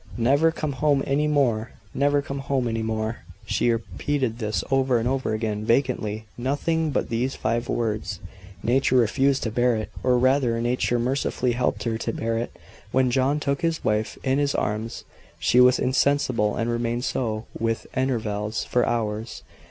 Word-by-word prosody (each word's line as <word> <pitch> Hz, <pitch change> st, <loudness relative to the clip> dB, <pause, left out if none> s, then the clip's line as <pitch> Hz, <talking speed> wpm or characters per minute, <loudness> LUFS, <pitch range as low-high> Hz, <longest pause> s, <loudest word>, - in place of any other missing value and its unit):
"Never 140 Hz, +7 st, +3 dB
come 155 Hz, -2 st, -3 dB
home 140 Hz, 0 st, +2 dB
any 145 Hz, +2 st, +1 dB
more! 120 Hz, -7 st, +1 dB, 0.2 s
Never 145 Hz, +1 st, +2 dB
come 140 Hz, 0 st, -5 dB
home 135 Hz, -2 st, -1 dB
any 115 Hz, -1 st, -1 dB
more!" 110 Hz, 0 st, -2 dB, 0.3 s
She -, -, +1 dB
repeated 115 Hz, +3 st, -1 dB
this 110 Hz, -2 st, -1 dB
over 135 Hz, -2 st, +3 dB
and 115 Hz, +1 st, -1 dB
over 130 Hz, -3 st, 0 dB
again, 110 Hz, -1 st, -2 dB
vacantly: 110 Hz, -3 st, 0 dB
nothing 155 Hz, +5 st, 0 dB
but 140 Hz, -, -1 dB
these 125 Hz, +4 st, -1 dB
five 120 Hz, +1 st, -1 dB
words. 110 Hz, -4 st, -2 dB, 0.4 s
Nature 130 Hz, +3 st, +2 dB
refused 135 Hz, +3 st, +3 dB
to 115 Hz, -, -2 dB
bear 120 Hz, +1 st, +2 dB
it; 110 Hz, -1 st, -4 dB
or 125 Hz, -1 st, +3 dB
rather, 130 Hz, -2 st, +2 dB
Nature 120 Hz, +1 st, +1 dB
mercifully 125 Hz, 0 st, 0 dB
helped 125 Hz, +1 st, -1 dB
her 115 Hz, -2 st, -1 dB
to -, -, -2 dB
bear 115 Hz, 0 st, -1 dB
it. 120 Hz, -, -4 dB, 0.4 s
When 130 Hz, -1 st, +2 dB
John 135 Hz, +4 st, +2 dB
took 140 Hz, 0 st, -1 dB
his 165 Hz, -1 st, -1 dB
wife 105 Hz, 0 st, 0 dB
in 135 Hz, +1 st, +1 dB
his 145 Hz, -1 st, +1 dB
arms 110 Hz, +2 st, -2 dB, 0.3 s
she 85 Hz, +9 st, +3 dB
was 125 Hz, 0 st, +6 dB
insensible; 130 Hz, -5 st, +1 dB
and 115 Hz, -, -1 dB
remained 120 Hz, +1 st, -1 dB
so, 110 Hz, -3 st, -2 dB
with 115 Hz, 0 st, -1 dB
intervals, 110 Hz, -5 st, -1 dB
for 125 Hz, -, +1 dB
hours. 110 Hz, -1 st, -2 dB
120 Hz, 165 wpm, -24 LUFS, 115-135 Hz, 0.4 s, was